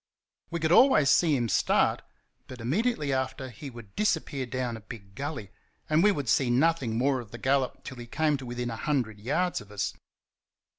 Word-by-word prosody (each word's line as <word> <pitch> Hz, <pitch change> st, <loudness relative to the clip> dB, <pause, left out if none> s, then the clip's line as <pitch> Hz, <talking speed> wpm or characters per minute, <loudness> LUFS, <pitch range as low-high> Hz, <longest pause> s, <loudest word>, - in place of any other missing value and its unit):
We 170 Hz, -, -3 dB
could 160 Hz, 0 st, 0 dB
always 180 Hz, -, +6 dB
see 160 Hz, -4 st, +4 dB
him 120 Hz, -3 st, 0 dB
start, 100 Hz, -, +2 dB, 0.5 s
but 130 Hz, -, -10 dB
immediately 150 Hz, -, 0 dB
after 130 Hz, 0 st, -2 dB
he 135 Hz, +5 st, -8 dB
would 115 Hz, -5 st, -13 dB
disappear 160 Hz, -10 st, 0 dB
down 125 Hz, -1 st, -3 dB
a 110 Hz, -, -9 dB
big 100 Hz, -2 st, -11 dB
gully, 135 Hz, -5 st, -5 dB, 0.4 s
and 155 Hz, +1 st, +3 dB
we 205 Hz, +3 st, +5 dB
would 145 Hz, -9 st, -3 dB
see 120 Hz, +3 st, +3 dB
nothing 130 Hz, -3 st, +2 dB
more 130 Hz, +2 st, +2 dB
of 120 Hz, -3 st, -9 dB
the 120 Hz, -, -8 dB
gallop 135 Hz, 0 st, 0 dB
till 130 Hz, -, -8 dB
he 120 Hz, -1 st, -8 dB
came 150 Hz, +3 st, +1 dB
to 130 Hz, -, -9 dB
within 120 Hz, 0 st, -3 dB
a -, -, -4 dB
hundred 120 Hz, -8 st, -1 dB
yards 175 Hz, -, 0 dB
of 105 Hz, 0 st, -15 dB
us. 105 Hz, -2 st, -2 dB
130 Hz, 195 wpm, -28 LUFS, 120-155 Hz, 0.5 s, always